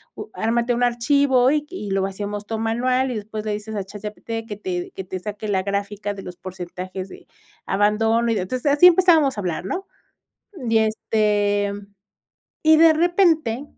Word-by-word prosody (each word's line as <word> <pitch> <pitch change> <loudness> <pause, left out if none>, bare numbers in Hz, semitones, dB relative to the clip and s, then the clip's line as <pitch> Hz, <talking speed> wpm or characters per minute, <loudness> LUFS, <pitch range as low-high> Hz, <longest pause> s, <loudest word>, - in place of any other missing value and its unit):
u 430 - -7
ármate 235 +2 0
un 245 - 0
archivo, 255 +1 +3
y 300 - +2
q 295 - -19
y 210 - -6
lo 195 0 +1
vaciamos 205 +1 -4
todo 225 -1 -3
manual, 250 +3 0
y 240 - -3
después 215 +1 -6
le 210 - -1
dices 210 +1 -6
a 200 - -2
ChatGPT 215 +3 -6
que 210 -2 -6
te 180 -2 -4
que 190 - -7
te 185 - -5
saque 210 +3 -6
la 190 -2 +1
gráfica 205 +1 -3
de 195 - -9
los 180 -1 -8
porcentajes 185 +1 -7
de - - -13 0.4
abandono 220 +3 +2
y - - +1
de". 195 - 0
Entonces 255 +8 -2
así 355 +5 +8
empezábamos 330 - +4
a - - -2
hablar 175 -2 -3
¿no? 385 - -4 0.8
Y, 225 0 +4
este, 210 -2 +1 0.9
y 315 0 +6
de 325 0 +7
repente, 325 - +2
220 Hz, 185 wpm, -22 LUFS, 200-255 Hz, 0.9 s, así